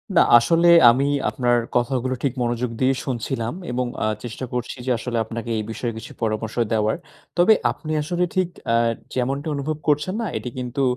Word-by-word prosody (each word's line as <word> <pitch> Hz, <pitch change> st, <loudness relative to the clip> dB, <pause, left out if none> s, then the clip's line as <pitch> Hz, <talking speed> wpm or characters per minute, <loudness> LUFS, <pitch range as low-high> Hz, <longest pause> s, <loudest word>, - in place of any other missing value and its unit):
না -, -, +7 dB, 0.2 s
আসলে 165 Hz, +9 st, +3 dB, 0.2 s
আমি 135 Hz, +4 st, +1 dB, 0.2 s
আপনার, 120 Hz, -1 st, +1 dB, 0.2 s
কথাগুলো 130 Hz, +1 st, 0 dB
ঠিক 135 Hz, -3 st, +1 dB
মনোযোগ 120 Hz, 0 st, -1 dB
দিয়ে 130 Hz, +1 st, +4 dB
শুনছিলাম 120 Hz, -1 st, -2 dB, 0.2 s
এবং 125 Hz, +1 st, -1 dB, 0.2 s
আ -, -, +1 dB, 0.2 s
চেষ্টা 120 Hz, +2 st, -5 dB
করছি 125 Hz, +2 st, -3 dB
যে 130 Hz, -, 0 dB
আসলে 120 Hz, +1 st, -3 dB
আপনাকে 115 Hz, +1 st, -6 dB
এই 110 Hz, -, -1 dB
বিষয়ে 115 Hz, 0 st, -3 dB
কিছু 110 Hz, -, -9 dB
পরামর্শ 110 Hz, 0 st, -2 dB, 0.2 s
দেওয়ার। 110 Hz, 0 st, +1 dB, 0.4 s
তবে 180 Hz, +6 st, +6 dB, 0.2 s
আপনি 155 Hz, -, -7 dB
আসলে 175 Hz, +4 st, -1 dB
ঠিক 185 Hz, -2 st, +1 dB, 0.2 s
অ্যা 115 Hz, 0 st, +3 dB, 0.4 s
যেমনটা 135 Hz, +4 st, -1 dB
অনুভব 150 Hz, +2 st, -2 dB
করছেন 150 Hz, +5 st, +2 dB
না? 225 Hz, -, -2 dB
এটি 110 Hz, +3 st, -5 dB
কিন্তু 125 Hz, +2 st, -2 dB
125 Hz, 175 wpm, -22 LUFS, 115-140 Hz, 0.4 s, না